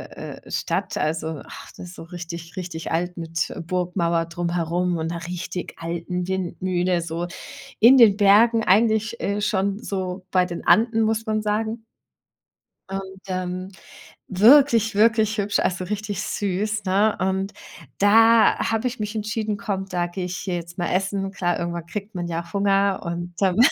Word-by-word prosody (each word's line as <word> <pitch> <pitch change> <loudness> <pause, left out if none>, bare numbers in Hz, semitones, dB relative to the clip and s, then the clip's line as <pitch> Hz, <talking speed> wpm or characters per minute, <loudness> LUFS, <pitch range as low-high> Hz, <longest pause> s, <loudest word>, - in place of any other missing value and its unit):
äh, - - -9
Stadt. - - -2
Also, 160 -1 -2
ach, - - -11
das 180 - -9
ist 180 - -12
so - - -9
richtig, 170 -1 -8
richtig 175 -3 -5
alt 175 +2 -1
mit 165 +1 -3
Burgmauer 175 -2 0
drumherum 175 +1 -1
und 160 0 -2
'ner 170 0 -5
richtig 180 0 -5
alten 170 +2 -4
Windmühle, 185 -1 -1
so 165 +1 -3 0.5
in 245 +5 +8
den 220 -5 +7
Bergen, 220 +3 +5
eigentlich, 220 +3 +2
äh, 205 +1 -1
schon 200 -1 0
so 185 -2 -4
bei 185 -1 +3
den 170 -1 -7
Anden, 225 0 +4
muss 220 +1 0
man 215 0 0
sagen. 220 +2 -2 1.1
Und 190 0 -6
ähm, 185 0 -3 0.6
wirklich, 225 +1 +5
wirklich 220 0 +3
hübsch, 205 0 0
also, 185 0 0
richtig 205 -1 -3
süß, 205 +2 -2
ne? 205 +3 +2
Und 190 +1 -1 0.5
da 225 +2 +6
habe 225 +3 0
ich 245 -1 -5
mich 210 +1 -3
entschieden: 215 0 -2
„Komm, 200 -4 -3
da 175 -1 -1
gehe 180 +1 -5
ich 180 0 -4
hier 185 -3 -3
jetzt 170 0 -7
mal 175 - 0
essen.“ 195 +1 -1
Klar, 175 -3 -1
irgendwann 170 -1 -4
kriegt 200 +2 -7
man 175 -1 -3
ja 170 0 -4
Hunger 200 -1 +2
und, 175 +1 -4
ähm, 190 0 +2
190 Hz, 160 wpm, -23 LUFS, 175-210 Hz, 1.1 s, in